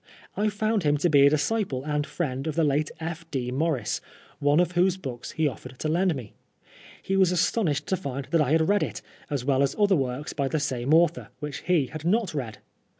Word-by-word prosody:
I 215 +1 +1
found 215 +1 0
him 150 -2 +2
to 170 +4 +1
be 140 -1 +7
a - - +6
disciple 150 - 0
and 150 0 -1
Mend 135 -3 -2
of 155 - -2
the 165 - +2
late 150 +1 +1
F. 165 0 -5
D. 125 -4 -2
Maurice, 145 0 -1 0.4
one 145 +2 +3
of 175 -1 +2
whose 180 +1 +2
books 130 -9 -7
he 160 -1 +1
offered 130 -1 -7
to 155 - -3
lend 175 +2 +2
me. 120 -6 -8 0.7
He 195 - -1
was 190 -2 +4
astonished 175 - +1
^•o 190 - 0
find 140 0 -4
that 165 - +4
I 145 0 +2
had 160 0 +3
read 205 0 +3
it, - - -3 0.3
as 140 -5 -2
well 135 -1 +2
as 140 0 +1
other 205 -2 +4
works 135 -1 -2
by 140 -2 -1
the 155 - -1
vme 135 -3 -2
author, 165 +1 +3
which 150 -2 -5
he 175 -6 +3
had 145 +5 -8
not 200 +2 +1
read. 125 -7 -4
155 Hz, 220 wpm, -26 LUFS, 140-175 Hz, 0.7 s, be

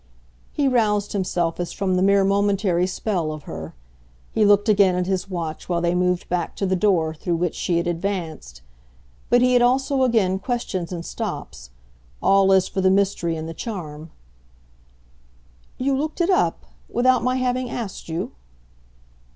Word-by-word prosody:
He 285 -2 0
roused 210 -5 +1
himself 180 -4 -1
as 175 - -3
from 195 -2 -1
the 185 - +1
mere 200 +1 +4
momentary 195 -2 +2
spell 185 -4 -2
of 155 -1 -7
her; 80 - -8 0.6
he 220 - +2
looked 205 +1 +4
again 200 -3 +4
at 180 0 0
his 190 +1 -2
watch 165 -4 -5
while 175 -1 +1
they 170 0 +1
moved 180 0 0
back 175 -1 -2
to 195 - -2
the 190 0 +1
door 175 -5 +2
through 170 +2 -2
which 170 0 -1
she 175 - -1
had 170 - 0
advanced. 170 - -4 0.7
But 245 0 +4
he 250 0 +4
had 245 - +5
also 265 +3 +2
again 215 -7 +2
questions 190 -6 -3
and 170 -2 -5
stops - - -6 0.5
all 195 0 +4
as 190 -1 +4
for 190 - -2
the 190 - +4
mystery 190 -4 +1
and 160 0 -5
the 165 - -6
charm. 160 -6 -6 1.7
"You 270 +1 0
looked 300 +5 -3
it 345 +2 +2
up 370 - +1 0.2
without 255 +1 +2
my 255 +1 +1
having 255 -1 -1
asked 215 -8 -6
you?" 165 +2 -3
190 Hz, 165 wpm, -22 LUFS, 170-220 Hz, 1.7 s, had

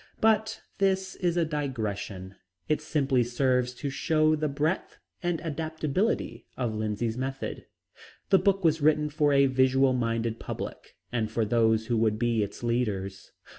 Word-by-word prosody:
But 220 0 +2 0.2
this 190 -1 +1
is 175 -2 0
a 170 - +3
digression. 110 - -4 0.3
It 155 0 +1
simply 140 -5 +1
serves 125 +1 +1
to 140 +2 -4
show 155 +2 +2
the 155 0 -1
breadth 150 +5 -1 0.2
and 175 -2 -1
adaptability 160 - -2
of 120 -4 -1
Lindsay's 110 +2 -2
method. 135 +1 -4 0.6
The 195 - +7
book 195 -1 +2
was 160 -1 +3
written 150 0 +3
for 145 0 +2
a 140 0 +5
visual 130 0 +3
minded 115 -2 -1
public - - -7 0.2
and 115 -3 -1
for 110 0 0
those 110 0 +2
who 120 0 0
would 110 -1 +2
be 115 -1 +1
its 100 +3 -4
leaders. 100 -6 -2
135 Hz, 150 wpm, -28 LUFS, 115-155 Hz, 0.6 s, The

